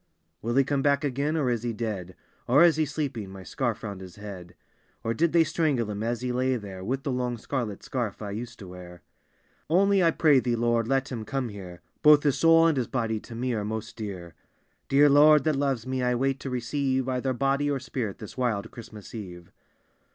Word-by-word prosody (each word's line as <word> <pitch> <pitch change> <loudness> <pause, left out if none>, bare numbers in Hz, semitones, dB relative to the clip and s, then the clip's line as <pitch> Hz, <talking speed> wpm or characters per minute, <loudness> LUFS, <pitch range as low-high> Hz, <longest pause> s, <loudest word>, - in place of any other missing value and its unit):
Will 120 +2 -2
he 135 - +5
come 140 0 0
back 140 0 +2
again 145 +3 -1
or 145 -5 +1
is 120 -2 -1
he 120 -1 -2
dead? 105 -5 -4 0.3
Or 140 +7 +6
is 165 -3 +5
be 155 -1 +1
sleeping, 135 -9 -4
my 95 0 -10
scarl 120 +2 -2
round 100 -3 -6
his 90 -2 -10
head? 100 -4 -9 0.5
Or 115 - 0
did 165 +8 +1
they 170 -1 +5
strangle 145 -8 0
him 105 0 -5
as 115 +1 -2
he 125 0 -2
lay 130 +1 +1
there, 100 -5 -7
With 130 +6 -2
the 135 - -2
long 125 -1 -2
scarlet 115 -4 -4
scarf 120 -6 -3
I 105 -2 -5
used 115 +3 -6
to 95 - -10
wear? 90 -1 -11 0.7
Only 195 +3 +4
I 165 - +5
pray 155 -4 +4
thee, 120 -1 0
Lord, 120 -1 +1
let 135 +1 0
him 115 -3 -4
omie 130 0 -3
here; 90 -4 -10 0.2
Both 150 -1 +7
bis 145 -3 +1
soul 165 0 +6
and 160 -4 +3
his 125 - 0
body 115 -4 -1
to 115 - -11
me 125 +1 -1
are 105 -2 -2
most 110 +1 -5
dear. 95 -6 -7 0.6
Dear 145 +2 +6
Lord, 150 0 +6
that 155 0 +1
loves 135 -4 -1
me, 130 0 -2
I 125 0 +1
wait 135 +2 0
to 135 - -5
receive 130 +1 -1
Either 130 0 -1
body 135 +3 +1
or 140 -2 0
spirit 120 -5 -4
this 110 - -10
wild 110 -4 -1
Christmas 110 -4 -11
eve. 90 -6 -9
125 Hz, 215 wpm, -27 LUFS, 110-140 Hz, 0.7 s, Both